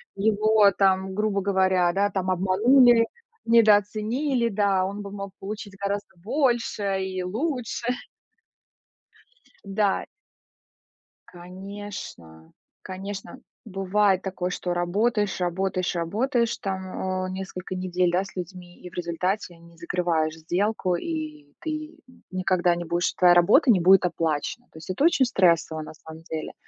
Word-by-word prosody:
его 215 0 +4
там, 190 -1 +2
грубо 205 0 0
говоря, 190 -2 +2
да, 200 +2 +2
там, 185 -2 -1
обманули, 230 +6 +5 0.4
недооценили. 230 +4 +3
Да, 200 -3 +1
он 200 +2 -5
бы 200 -1 -8
мог 200 -1 -6
получить 205 0 -7
гораздо 200 0 -4
больше 230 -6 0
и 185 -1 -3
лучше. 240 - -3 1.8
Да. 200 0 0 1.2
Конечно, 180 - -10 0.3
конечно, 195 +1 -7 0.3
бывает 195 -1 +1
такое, 185 -2 -3
что 180 0 -3
работаешь, 205 +4 0
работаешь, 185 +1 -1
работаешь, 230 - 0
там, 190 -1 -3
а, - - -4
несколько 185 0 -6
недель, 180 -1 0
да, 180 +2 +1
с 195 - -12
людьми, 180 0 -8
и 180 - -10
в - - -26
результате 175 +2 -2
не 170 0 -18
закрываешь 170 -2 -1
сделку, 180 +3 -1
и 310 - -5
ты, 310 -1 -6
м, - - -21
никогда 185 -2 +1
не 175 0 -5
будешь 175 +2 0
твоя 180 -1 +5
работа 210 - +5
не 195 - +4
будет 185 +2 +6
оплачена. 165 +7 -2
То - - -15
есть 160 - -11
это 185 +9 -1
очень 310 -5 +4
стрессово, 170 -8 +2
на 155 - -9
самом 160 +1 -13
деле. 160 -2 -5
190 Hz, 130 wpm, -25 LUFS, 180-210 Hz, 1.8 s, будет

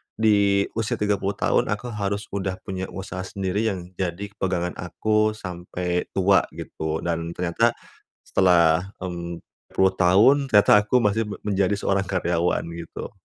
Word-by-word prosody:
di 100 -2 +3
usia 115 +2 -1
30 100 -1 0
tahun - - +1
aku 105 +4 -3
harus 100 -1 -3
udah 95 -1 -2
punya 95 -1 -4
usaha 95 -1 -6
sendiri 100 +1 -1
yang 90 -3 -6
jadi 95 +3 -3
pegangan 90 -2 -1
aku 110 +4 +1
sampai 90 -2 -4
tua 95 +1 +4
gitu 80 0 -4
dan 85 0 -2
ternyata 90 +7 +1 0.5
setelah, 90 -1 +3 0.2
mmm, 85 -1 -5 0.4
puluh 95 0 +4
tahun 115 +10 +5
ternyata 105 -1 +6
aku 110 +4 +2
masih 105 +1 +1
me 105 - -5
menjadi 100 -1 +1
seorang 100 -1 0
karyawan 90 -3 0
gitu. 85 0 -7
95 Hz, 140 wpm, -24 LUFS, 90-105 Hz, 0.5 s, ternyata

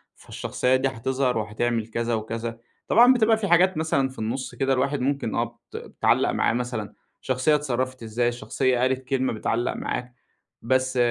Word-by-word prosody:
فالشخصية 125 +1 -1
دي 130 +1 +1
هتظهر 130 0 -1
وهتعمل 110 +1 -1
كذا 115 +1 -2
وكذا، 115 +1 -4 0.3
طبعًا 245 +3 +7
بتبقى 225 -2 +3
في 205 -3 -2
حاجات 180 +1 +4
مثلًا 140 -4 +1
في 130 - -12
النُصّ 120 +3 -3
كده 135 +2 +1
الواحد 135 +2 0
ممكن 135 -3 -1
آه 115 - +2 0.3
بت - - -4
بتعلّق - - +1
معايا - - +1
مثلًا، 120 -3 -3 0.3
شخصية 130 +4 +2
اتصرفت 130 -3 -2
إزاي 115 +2 0
الشخصية 125 +1 -1
قالت 130 +1 +1
كلمة 130 -3 0
بتعلّق 115 +2 -1
معاك 125 0 -4 0.5
بس 130 +1 0
130 Hz, 160 wpm, -24 LUFS, 115-135 Hz, 0.5 s, طبعًا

